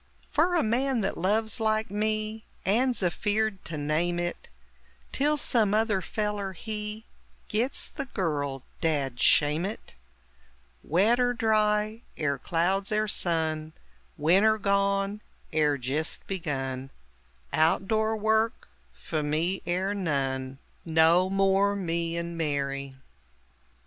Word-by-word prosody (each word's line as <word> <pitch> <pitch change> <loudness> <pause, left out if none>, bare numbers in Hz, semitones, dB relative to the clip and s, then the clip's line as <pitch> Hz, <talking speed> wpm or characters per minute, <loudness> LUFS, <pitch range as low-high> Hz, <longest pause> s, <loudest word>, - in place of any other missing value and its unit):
Fer 340 +4 +2
a 340 - +3
man 250 +2 +1
that 195 - -1
loves, 220 +6 +1
like 220 -2 0
me, 215 +1 -1 0.2
And's 240 +3 +2
afeard 205 +3 0
to 160 - -5
name 155 +4 0
it, 175 0 -4 0.6
Till 295 +2 +1
some 220 -7 +2
other 215 -3 +2
feller, 205 0 -2
he 210 +3 -5 0.4
Gits 235 +6 0
the 275 - -5
girl 145 - -2 0.2
dad 140 -7 0
shame 150 +5 +4
it! 205 +4 -6 0.9
Wet 205 - +3
er 245 0 +2
dry, 215 -1 +1 0.2
er 140 -3 0
clouds 185 +7 0
er 215 0 +1
sun 160 -5 0 0.4
Winter 195 +8 +4
gone, 200 0 +1 0.3
er 150 -2 +2
jist 140 +5 -3
begun 135 -7 -3 0.6
Out 165 +4 +2
door 220 +1 +1
work 220 +1 +1 0.3
few 155 -2 -3
me 160 +6 0
er 185 +3 0
none. 135 -7 -2 0.3
No 165 +3 +4
more 195 +1 +3
"Me 170 -3 -1
and 170 0 -4
Mary!" 140 -3 -2
195 Hz, 120 wpm, -27 LUFS, 160-215 Hz, 0.9 s, shame